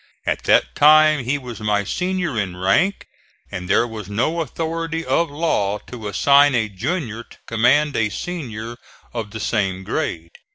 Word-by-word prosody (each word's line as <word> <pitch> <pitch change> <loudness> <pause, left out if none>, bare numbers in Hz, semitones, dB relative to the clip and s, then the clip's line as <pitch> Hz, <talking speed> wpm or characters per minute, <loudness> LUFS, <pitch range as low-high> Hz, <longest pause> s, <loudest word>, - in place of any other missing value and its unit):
At - - -2
that - - +3
time 155 -2 +5
he 135 +4 0
was 125 -4 -8
my 105 -1 0
senior 180 - -2
in 95 -5 -2
rank 175 - +1 0.5
and 90 0 -6
there 105 +4 +4
was 110 -4 -8
no 140 +11 0
authority 165 +2 -3
of 170 - +1
law 145 -10 0
to 110 -1 -9
assign 140 +7 +4
a 110 -3 0
junior 115 - -3
to - - -17
command 130 +6 +2
a 105 -2 +1
senior 120 -8 -6 0.4
of 115 -3 -4
the 110 +2 -7
same 95 -4 -1
grade. 90 - -3
120 Hz, 160 wpm, -21 LUFS, 105-155 Hz, 0.5 s, time